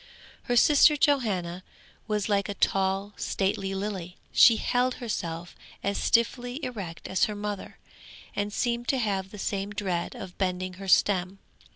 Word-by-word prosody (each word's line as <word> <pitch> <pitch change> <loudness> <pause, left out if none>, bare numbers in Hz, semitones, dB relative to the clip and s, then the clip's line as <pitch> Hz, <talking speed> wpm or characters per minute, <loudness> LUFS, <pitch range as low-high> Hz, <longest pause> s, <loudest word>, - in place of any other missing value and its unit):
Her 245 - 0
sister 295 +4 +6
Johanna 195 -12 +1 0.4
was 210 -2 -1
like 200 -1 +1
a 200 - -3
tall, 195 +1 0
stately 195 0 -1
lily; 190 -3 -4
she 230 - +7
held 250 +2 +1
herself 175 -8 -4 0.3
as 200 0 0
stiffly 245 +2 +1
erect 195 -9 -6
as 185 - +2
her 210 - -4
mother, 205 -1 -5 0.6
and 205 0 -1
seemed 235 +2 -1
to 270 - +2
have 195 -5 -1
the 210 - -10
same 200 0 -2
dread 190 -4 -3
of 180 - -9
bending 185 -1 -1
her 195 - -6
stem. 190 0 +3
200 Hz, 150 wpm, -27 LUFS, 190-235 Hz, 0.6 s, she